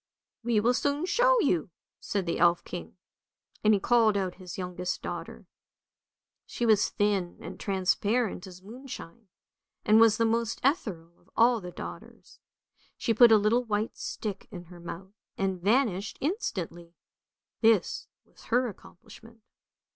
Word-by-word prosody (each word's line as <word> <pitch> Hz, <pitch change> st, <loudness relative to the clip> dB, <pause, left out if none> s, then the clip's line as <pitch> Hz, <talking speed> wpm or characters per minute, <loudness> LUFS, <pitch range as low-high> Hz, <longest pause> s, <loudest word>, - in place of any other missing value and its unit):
" -, -, -65 dB
" -, -, -64 dB
We 230 Hz, -2 st, +2 dB
will 235 Hz, +4 st, +3 dB
soon 285 Hz, +5 st, 0 dB
show -, -, +4 dB
you! 180 Hz, -, +1 dB, 0.2 s
" -, -, -65 dB
said 200 Hz, -3 st, -2 dB
the 170 Hz, -, -2 dB
elf 175 Hz, 0 st, +4 dB
king, 180 Hz, +1 st, -8 dB, 0.7 s
and 215 Hz, -, +5 dB
he 205 Hz, -, +4 dB
called 225 Hz, -1 st, +3 dB
out 190 Hz, -2 st, -1 dB
his 180 Hz, -2 st, -8 dB
youngest 180 Hz, -1 st, -4 dB
daughter; -, -, -6 dB, 1.0 s
she 240 Hz, -, -2 dB
was 215 Hz, -2 st, +4 dB
thin 200 Hz, -4 st, 0 dB
and -, -, -9 dB
transparent 200 Hz, +2 st, 0 dB
as 185 Hz, 0 st, -13 dB
moonshine, 230 Hz, -3 st, -10 dB, 0.6 s
and 215 Hz, +1 st, +6 dB
was 225 Hz, -1 st, +6 dB
the 230 Hz, -, +2 dB
most 230 Hz, 0 st, 0 dB
ethereal 190 Hz, -, -1 dB
of 175 Hz, -, -29 dB
all 235 Hz, -1 st, +4 dB
the 180 Hz, -, -7 dB
daughters. -, -, -10 dB, 0.6 s
She 230 Hz, -, 0 dB
put 235 Hz, +1 st, +7 dB
a 220 Hz, -, +8 dB
little 215 Hz, +4 st, +2 dB
white 215 Hz, -1 st, -2 dB
stick 205 Hz, -3 st, -5 dB
in 180 Hz, -4 st, -8 dB
her 175 Hz, -, -12 dB
mouth 175 Hz, +3 st, -9 dB, 0.2 s
and 190 Hz, -2 st, -1 dB
vanished 210 Hz, -2 st, +1 dB
instantly; 175 Hz, -, -4 dB, 0.7 s
this 220 Hz, -5 st, +2 dB, 0.2 s
was -, -, -20 dB
her 250 Hz, +1 st, +2 dB
accomplishment. 225 Hz, +3 st, -15 dB
210 Hz, 155 wpm, -28 LUFS, 180-235 Hz, 1.0 s, a